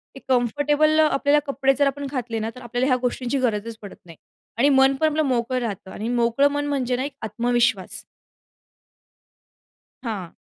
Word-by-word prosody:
ते - - -9
कम्फर्टेबल 290 +5 +2
आपल्याला 295 -1 +3
कपडे 270 -1 +2
जर 285 0 +3
आपण 285 +1 -3
घातले 240 -4 -3
ना, 220 +1 -2
तर 250 - -11
आपल्याला 245 +2 -1
ह्या 255 - +3
गोष्टींची 250 +1 -1
गरजच 225 -2 -2
पडत 205 - -10
नाही 165 -2 -14 0.4
आणि 275 +5 +4
मन 270 0 +4
पण 315 +4 +2
आपलं 310 +1 0
मोकळं 255 -2 0
राहतं 200 -5 -5
आणि 215 - -5
मोकळं 240 +3 +2
मन 290 0 -2
म्हणजे 260 -3 -1
ना, 255 - -2
एक 285 - -6
आत्मविश्वास. 235 -2 0 2.0
हां. 205 -8 -5
255 Hz, 165 wpm, -23 LUFS, 230-280 Hz, 2.0 s, आणि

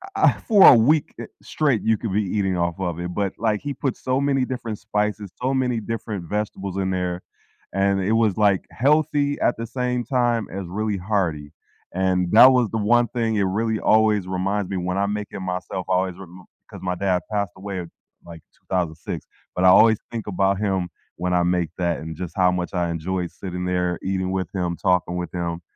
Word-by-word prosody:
I 395 - -1
I - - -13
for 205 -4 +8
a 130 - +10
week, 145 +7 +3
eh, - - -5 0.2
straight, 140 -8 0
you 110 -1 +2
could 105 -4 -4
be 105 +1 +2
eating 95 -1 -1
off 85 +1 -1
of 85 -3 -3
it, 90 0 -4
but 100 -2 -1
like, 110 -2 0
he 145 -1 -4
put 135 -1 -2
so 130 +1 -1
many 140 -2 +1
different 115 -4 -5
spices, 105 -1 -2
so 130 +2 0
many 125 -3 0
different 110 -4 -5
vegetables 100 -2 -3
in 95 -1 0
there, 90 -1 -2 0.5
and 95 0 +1
it 105 +4 +1
was, 110 -4 +2
like, 100 -3 +3
healthy 145 +1 +1
at - - +2
the 115 0 -5
same 125 0 -2
time 120 -5 +1
as 95 -1 -5
really 105 +2 -2
hearty. 90 -7 -2 0.4
And 90 -1 0
that 125 +4 +9
was 125 -5 +2
the 110 - -1
one 120 +3 +3
thing 115 -3 -1
it 100 - +2
really 110 +3 0
always 110 -3 +3
reminds 95 +1 -1
me 95 - -2
when 90 +1 -2
I 100 - +2
make 105 0 -3
it - - -6
myself, 90 0 -4
I 95 - +2
always 90 -1 0
rem 90 -1 -12 0.3
'cause - - -10
my 90 -1 -2
dad 90 -1 0
passed 100 -3 -1
away, 95 -2 -5 0.4
like, 85 -2 -11
2006, 85 -4 -4 0.3
but 90 - 0
I - - +8
always 110 +3 +6
think 115 -3 -5
about 95 0 +1
him 95 -4 -1 0.3
when 90 0 -1
I 90 -1 +3
make 90 -2 +1
that 85 -1 0
and 80 0 -7
just 90 0 -6
how 90 -1 +4
much 90 0 -3
I 85 -1 0
enjoyed 85 +1 -3
sitting 90 -2 -6
there, 90 -1 0
eating 95 -1 -1
with 95 -2 -2
him, 90 -2 -1
talking 90 -2 +1
with 90 0 -4
him. 85 -1 -3
95 Hz, 210 wpm, -23 LUFS, 90-110 Hz, 0.5 s, a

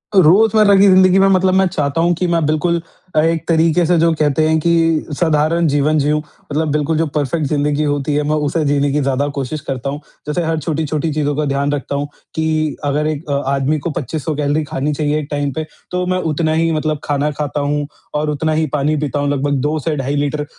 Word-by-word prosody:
अ, - - +7
रोज़मर्रा 210 +5 +5
की 195 +1 +6
ज़िंदगी 185 0 +5
में 195 - +5
मतलब 190 -1 +3
मैं 190 0 +4
चाहता 150 -3 -1
हूँ 175 +1 +3
कि 180 +2 -1
मैं 170 -2 +1
बिल्कुल 165 +3 0 0.3
अ, - - +4
एक 165 0 0
तरीके 165 +1 +3
से 175 +1 +2
जो 165 +1 +3
कहते 155 +1 +2
हैं 160 0 +2
कि 165 -1 +2
साधारण 160 0 +2
जीवन 145 +1 +2
जिऊँ 150 +2 +1
मतलब 150 0 -4
बिल्कुल 150 +2 0
जो 165 - +2
परफ़ेक्ट 150 +2 -1
ज़िंदगी 150 0 0
होती 145 0 -1
है 150 - +1
मैं 155 - +2
उसे 155 +2 0
जीने 140 0 +1
की 150 +1 +1
ज़्यादा 135 +1 0
कोशिश 140 +3 -3
करता 135 0 -3
हूँ। 145 +1 -4 0.3
जैसे 150 +4 -1
हर 160 -1 -1
छोटी-छोटी 155 0 -2
चीज़ों 145 -1 -1
का 150 +1 -1
ध्यान 140 0 0
रखता 140 0 -3
हूँ, 145 +1 -2 0.3
कि 155 -1 0
अगर 150 +2 0
एक 155 0 -4
अ, - - 0 0.2
आदमी 140 +3 +1
को 170 - -4
2500 155 0 -3
कैलोरी 145 +1 0
खानी 145 0 -2
चाहिए 150 0 0
एक 150 - -6
टाइम 145 -1 -1
पे 155 +3 -3 0.3
तो 180 0 -1
मैं 185 0 +1
उतना 155 +1 0
ही 165 +1 +1
मतलब 155 -1 -1
खाना 145 +1 0
खाता 145 -1 -3
हूँ 145 0 -1 0.3
और 150 +1 0
उतना 155 +2 -1
ही 155 +1 +1
पानी 150 +1 +1
पीता 145 0 -2
हूँ 145 0 0
लगभग 145 0 0
2 150 +3 0
से 155 +1 -2
ढाई 135 +1 -2
लीटर 145 +1 -1
150 Hz, 225 wpm, -17 LUFS, 145-165 Hz, 0.3 s, अ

